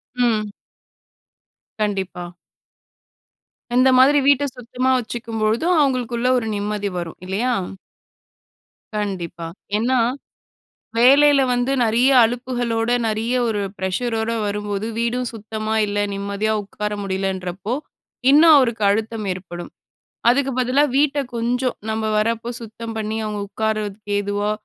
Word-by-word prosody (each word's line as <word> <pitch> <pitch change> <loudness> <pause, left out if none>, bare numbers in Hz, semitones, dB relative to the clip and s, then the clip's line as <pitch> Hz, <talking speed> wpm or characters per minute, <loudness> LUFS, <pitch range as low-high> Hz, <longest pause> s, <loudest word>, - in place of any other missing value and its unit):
ம். 220 -4 +1 1.3
கண்டிப்பா. 190 -4 -2 1.5
இந்த 255 +1 +5
மாதிரி 275 +3 +6
வீட்ட 285 0 +5
சுத்தமா 250 +1 -2
வச்சுக்கும்பொழுதும் 230 +7 -1
அவங்களுக்குள்ள 250 -3 +1
ஒரு 225 - -2
நிம்மதி 205 0 -2
வரும், 170 -2 -5
இல்லையா? 235 +7 0 1.4
கண்டிப்பா, 185 -5 -4 0.3
ஏன்னா 245 +3 +1 1.0
வேலையில 280 +4 +6
வந்து 245 +2 0
நெறைய 235 +4 +3
அழுப்புகளோட 240 -1 -1 0.2
நெறைய 225 +3 -1
ஒரு 210 -2 -1 0.2
ப்ரெஷரோட 220 +4 -1
வரும்போது 205 0 -3
வீடும் 240 +1 -1
சுத்தமா 220 0 -4
இல்ல, 205 0 -3 0.2
நிம்மதியா 200 +2 -1
உட்கார 210 +1 -5
முடியலன்றப்போ 190 +1 -3 0.6
இன்னும் 310 +2 +8
அவருக்கு 235 -5 +1
அழுத்தம் 220 +1 -1
ஏற்படும். 175 -1 -8 0.6
அதுக்கு 270 +3 +3
பதிலா 255 +3 +3
வீட்ட 290 0 +2 0.2
கொஞ்சம் 245 +2 -1
நம்ம 220 0 -2 0.2
வரப்போ 230 +2 -1
சுத்தம் 225 0 -7
பண்ணி, 215 0 -2
அவங்க 210 -1 -3
உட்காருறதுக்கு 215 -1 -3
ஏதுவா 205 +1 -1
225 Hz, 105 wpm, -21 LUFS, 205-245 Hz, 1.5 s, இன்னும்